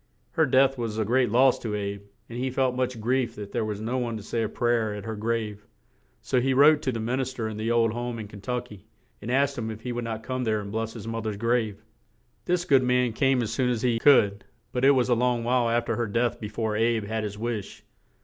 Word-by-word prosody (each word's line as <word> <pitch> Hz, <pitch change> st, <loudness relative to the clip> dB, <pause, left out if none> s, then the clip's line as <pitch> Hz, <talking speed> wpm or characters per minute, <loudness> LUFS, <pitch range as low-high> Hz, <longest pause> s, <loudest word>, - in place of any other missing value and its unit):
Her 160 Hz, -2 st, +2 dB
death 135 Hz, 0 st, +3 dB
was 115 Hz, -2 st, -3 dB
a 110 Hz, -, 0 dB
great 125 Hz, +2 st, +2 dB
loss 125 Hz, +4 st, +4 dB
to 110 Hz, -3 st, -3 dB
"Abe," 100 Hz, -1 st, -4 dB, 0.3 s
and 120 Hz, +1 st, -7 dB
he 130 Hz, +1 st, -1 dB
felt 130 Hz, -1 st, +1 dB
much 125 Hz, -2 st, -1 dB
grief 120 Hz, +1 st, 0 dB
that 100 Hz, -1 st, -8 dB
there -, -, -1 dB
was 105 Hz, -1 st, -3 dB
no 120 Hz, +4 st, -2 dB
one 120 Hz, -2 st, -2 dB
to 105 Hz, -, -9 dB
say 115 Hz, +2 st, -2 dB
a 110 Hz, -, -1 dB
pray 120 Hz, +1 st, +1 dB
er 110 Hz, -3 st, 0 dB
at 105 Hz, -, -7 dB
her 110 Hz, -1 st, -4 dB
grave; 105 Hz, -1 st, -3 dB, 0.6 s
so 125 Hz, -, +1 dB
he 130 Hz, +1 st, +1 dB
wrote 150 Hz, +2 st, +6 dB
to 130 Hz, -, -1 dB
the 115 Hz, -, -4 dB
min 120 Hz, +4 st, -1 dB
is 130 Hz, -1 st, -2 dB
ter 115 Hz, -4 st, -4 dB
in 110 Hz, -, -5 dB
the 110 Hz, +1 st, -2 dB
old 115 Hz, -2 st, +2 dB
home 120 Hz, 0 st, -4 dB
in 110 Hz, -2 st, -6 dB
Ken 100 Hz, -1 st, -12 dB
tuck 125 Hz, +2 st, -3 dB
y, 105 Hz, -, -10 dB, 0.4 s
and 115 Hz, -, -6 dB
asked 140 Hz, +1 st, +1 dB
him 110 Hz, -1 st, -3 dB
if 110 Hz, 0 st, -7 dB
he 125 Hz, -, -4 dB
would 120 Hz, 0 st, -3 dB
not 110 Hz, -1 st, -4 dB
come 130 Hz, +1 st, -3 dB
there 110 Hz, -2 st, +1 dB
and 100 Hz, -1 st, -7 dB
bless 110 Hz, +1 st, -3 dB
his 115 Hz, -2 st, -8 dB
moth 115 Hz, -1 st, -3 dB
er's 105 Hz, -2 st, -3 dB
grave. 110 Hz, -2 st, 0 dB, 0.6 s
This 175 Hz, 0 st, 0 dB
good 135 Hz, -6 st, +5 dB
man 125 Hz, -2 st, +2 dB
came 135 Hz, +1 st, +2 dB
as 115 Hz, 0 st, -3 dB
soon 125 Hz, +1 st, +1 dB
as 120 Hz, -2 st, -1 dB
he 120 Hz, -2 st, +2 dB
could, 105 Hz, -7 st, +4 dB, 0.3 s
but 125 Hz, -1 st, -2 dB
it 135 Hz, -, +7 dB
was 125 Hz, -, +2 dB
a 125 Hz, -, +3 dB
long 120 Hz, 0 st, +1 dB
while 120 Hz, 0 st, +2 dB
af 120 Hz, 0 st, +1 dB
ter -, -, -1 dB
her 120 Hz, -1 st, -1 dB
death 120 Hz, +3 st, 0 dB
be 105 Hz, -, -5 dB
fore 110 Hz, 0 st, -2 dB
"Abe" 115 Hz, 0 st, +1 dB
had 110 Hz, +1 st, -3 dB
his 105 Hz, -1 st, -5 dB
wish. 110 Hz, -2 st, -4 dB
115 Hz, 270 wpm, -26 LUFS, 110-125 Hz, 0.6 s, it